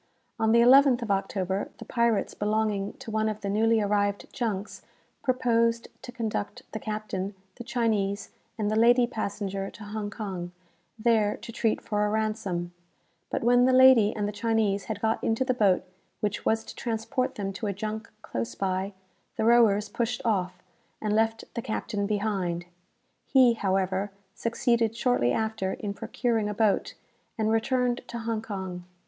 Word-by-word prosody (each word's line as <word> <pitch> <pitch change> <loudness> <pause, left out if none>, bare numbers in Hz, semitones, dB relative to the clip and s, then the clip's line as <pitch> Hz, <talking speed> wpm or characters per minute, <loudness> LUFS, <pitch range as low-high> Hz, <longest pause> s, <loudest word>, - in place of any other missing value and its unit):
On 220 0 +3
the 235 +1 +6
11th 260 0 +6
of 215 - -2
October, 195 0 -1
the - - -9
pirates 235 -3 +1
belonging 210 -1 0
to 225 - -9
one 220 0 +1
of 215 0 -5
the 200 - -3
newly 225 +2 +3
arrived 205 0 0
junks 215 -5 -3 0.4
proposed 230 -2 +1
to 255 - -8
conduct 220 -4 -3
the 220 - -4
captain, 210 -3 -4 0.2
the 240 - -7
Chinese, 215 -5 -1 0.3
and 210 -1 0
the - - +1
lady 240 +2 +5
passenger 200 -4 -3
to 220 - -12
Hong 210 0 -4
Kong, 190 -5 -5 0.4
there 215 -2 +2
to 235 - -9
treat 225 -1 0
for 210 -1 -1
a 210 - +1
ransom; 210 -5 -2 0.6
but - - -2
when 245 +1 +5
the 260 - +4
lady 255 -5 +7
and 205 -2 -1
the - - -2
Chinese 210 -2 0
had - - -4
got 225 0 0
into 225 +3 +1
the 255 - +2
boat 200 -7 +3 0.4
which 210 -1 -2
was 225 0 +2
to - - -9
transport 240 +3 -2
them 195 -1 -3
to 210 +3 -4
a - - 0
junk 215 +3 -5
close 115 0 -4
by, 190 - -1 0.4
the 220 - +1
rowers 225 -3 +5
pushed 235 +2 -2
off, 190 -5 0 0.4
and 210 -1 -1
left 225 +1 +1
the 235 - -3
captain 215 -3 -2
behind. 195 -5 -1 0.6
He, 255 -3 +6
however, 195 -1 0 0.2
succeeded 230 0 +1
shortly 240 - +2
after 220 - -1
in 205 -2 -4
procuring 225 0 -1
a 210 - -4
boat, 215 -2 +1 0.4
and 220 -1 +1
returned 245 +2 +1
to 235 - -6
Hong 225 -1 -2
Kong. 190 -5 -5
215 Hz, 165 wpm, -27 LUFS, 200-230 Hz, 0.6 s, lady